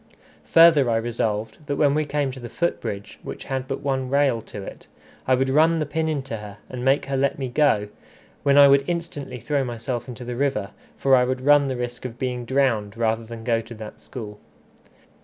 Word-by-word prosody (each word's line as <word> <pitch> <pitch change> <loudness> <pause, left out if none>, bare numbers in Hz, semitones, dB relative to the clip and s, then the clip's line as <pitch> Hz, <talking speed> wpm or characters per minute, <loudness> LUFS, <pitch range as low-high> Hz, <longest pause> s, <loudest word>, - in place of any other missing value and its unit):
Further 165 -6 +6
I 115 - +2
resolved, 110 -2 -2
that 145 - -1
when 145 -1 +3
we 155 +1 +1
came 145 -2 -1
to 130 - -9
the 120 -1 -8
foot 170 +7 -1
bridge, 100 0 -6
which - - -7
had 130 -1 -3
but 135 - -4
one 135 -2 -1
rail 140 -4 +2
to 105 -2 -9
it, - - -10 0.4
I 130 - +5
would 135 +1 +1
run 160 +4 +4
the 155 - 0
pin 160 +2 -1
into 135 -6 -3
her 105 -1 -9
and 125 -1 -6
make 135 +2 +3
her 140 - -2
let 135 +1 +1
me 135 -2 -3
go, 120 -6 +2 0.5
when 140 0 +3
I 140 0 +9
would 140 0 +5
instantly 165 -7 -4
throw 140 +4 0
myself 120 0 -4
into 125 0 -8
the 120 0 -4
river, 120 -7 -1 0.3
for 135 -1 +4
I 125 - +4
would 130 +1 -1
run 145 +1 +5
the 130 -2 -2
risk 120 0 -5
of 125 -2 -6
being 125 -2 -3
drowned 115 -6 0
rather 115 0 0
than 115 0 -9
go 115 -1 +1
to 115 +1 -11
that 110 -1 -9
school. 105 -5 -9
130 Hz, 215 wpm, -23 LUFS, 115-140 Hz, 0.5 s, I